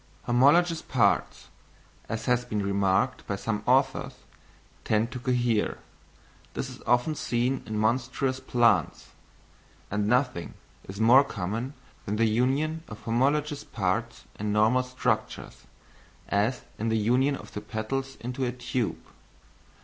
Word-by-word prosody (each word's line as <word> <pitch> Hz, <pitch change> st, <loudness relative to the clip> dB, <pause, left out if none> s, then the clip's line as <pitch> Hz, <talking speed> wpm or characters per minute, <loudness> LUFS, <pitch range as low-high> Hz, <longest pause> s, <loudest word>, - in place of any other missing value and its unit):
Homologous 155 Hz, +8 st, +4 dB
parts, -, -, +1 dB, 0.6 s
as 110 Hz, -1 st, -3 dB
has 125 Hz, -1 st, +2 dB
been 105 Hz, -4 st, -2 dB
remarked 100 Hz, +4 st, +1 dB
by 100 Hz, -, -1 dB
some 105 Hz, +1 st, -2 dB
authors, 135 Hz, +2 st, +2 dB, 0.7 s
tend 110 Hz, +3 st, +1 dB
to 125 Hz, -, -5 dB
cohere; 120 Hz, -4 st, 0 dB, 0.8 s
this -, -, -3 dB
is -, -, -12 dB
often 120 Hz, +6 st, +3 dB
seen 125 Hz, -1 st, -1 dB
in 110 Hz, -1 st, -3 dB
monstrous 130 Hz, +4 st, 0 dB
plants: 115 Hz, -, +1 dB, 0.8 s
and 105 Hz, 0 st, 0 dB
nothing 125 Hz, -6 st, 0 dB, 0.3 s
is 100 Hz, +2 st, -7 dB
more 120 Hz, +5 st, +7 dB
common 115 Hz, +3 st, -4 dB, 0.3 s
than 105 Hz, -, -1 dB
the 115 Hz, +1 st, +3 dB
union 135 Hz, +8 st, +1 dB
of 105 Hz, -, -10 dB
homologous 145 Hz, +5 st, 0 dB
parts 110 Hz, +4 st, -2 dB, 0.2 s
in 105 Hz, 0 st, -1 dB
normal 110 Hz, +4 st, +4 dB
structures, 125 Hz, 0 st, -3 dB, 0.6 s
as 110 Hz, +5 st, +1 dB, 0.2 s
in 115 Hz, +2 st, -1 dB
the 110 Hz, -, +2 dB
union 125 Hz, +6 st, +2 dB
of -, -, -11 dB
the 105 Hz, -, -5 dB
petals 135 Hz, +5 st, -4 dB
into 125 Hz, +3 st, -3 dB
a 125 Hz, -, 0 dB
tube. 125 Hz, -2 st, -2 dB
120 Hz, 130 wpm, -27 LUFS, 110-130 Hz, 0.8 s, more